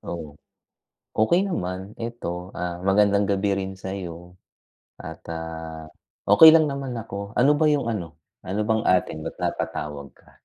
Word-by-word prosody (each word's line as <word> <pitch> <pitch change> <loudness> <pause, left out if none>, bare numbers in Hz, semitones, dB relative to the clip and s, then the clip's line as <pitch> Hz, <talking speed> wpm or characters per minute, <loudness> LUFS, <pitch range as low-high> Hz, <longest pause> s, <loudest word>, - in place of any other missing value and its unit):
Oh? 80 -4 -7 0.8
Okey 140 +12 +4
naman, 90 - -2 0.2
'eto 115 -2 -5 0.3
ah 90 -1 -3
magandang 100 +1 +4
gabi 100 +1 +1
rin 95 0 -4
sayo, 90 -2 -7 0.6
at 80 0 -8
ah 80 -1 -6 0.5
okey 160 +10 +10
lang 155 - +5
naman 135 -2 -4
ako. 100 -1 -7
Ano 135 +4 +6
ba 160 - +4
yung 140 -4 0
ano? 100 -6 -3 0.4
Ano 100 +3 -2
bang 110 -1 +1
atin 90 -3 0
ba't - - -5
napatawag 70 -2 -3
ka? - - -23
95 Hz, 145 wpm, -24 LUFS, 85-110 Hz, 0.8 s, okey